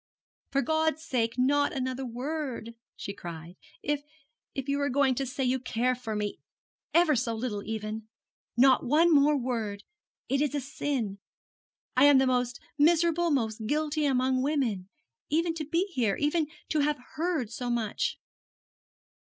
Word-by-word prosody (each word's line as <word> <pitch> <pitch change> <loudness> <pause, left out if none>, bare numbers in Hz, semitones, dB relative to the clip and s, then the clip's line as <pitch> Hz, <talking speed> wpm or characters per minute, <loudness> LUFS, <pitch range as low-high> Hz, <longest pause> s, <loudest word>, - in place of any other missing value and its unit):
'For 275 0 +1
God's 315 0 +1
sake, 230 -3 0
not 285 +3 +3
another 260 -1 -2
word,' 250 -1 -4 0.2
she 200 - -6
cried,' 170 -2 -8 0.3
if 295 -1 0 0.5
if 270 0 -3
you 280 0 0
are 285 - +1
going 270 0 +3
to 270 +2 -2
say 265 +2 -3
you 255 +1 +1
care 250 0 0
for 245 -3 -5
me, 210 -1 -3 0.5
ever 335 -3 +4
so 230 -1 0
little, 220 -3 -3
even. 220 0 -4 0.5
Not 260 +1 +6
one 320 +6 +4
more 290 0 +5
word. 225 -6 -3 0.4
It 275 +1 +1
is 295 -1 0
a - - +1
sin. 260 -7 -3 0.8
I 255 +2 +6
am 290 -1 +7
the 265 - +4
most 250 -1 0 0.2
miserable, 340 +2 +4
most 220 -6 -1
guilty, 300 +1 +1
among 260 -1 +2
women, 250 -10 0 0.4
even 330 +3 +1
to 320 -2 -4
be 335 +5 +1
here, 225 -8 +1
even 300 +1 +1 0.2
to 310 - +1
have 295 0 +2 0.2
heard 320 -9 -1
so 245 -1 -4
much.' 230 -3 -1
265 Hz, 155 wpm, -29 LUFS, 235-295 Hz, 0.8 s, am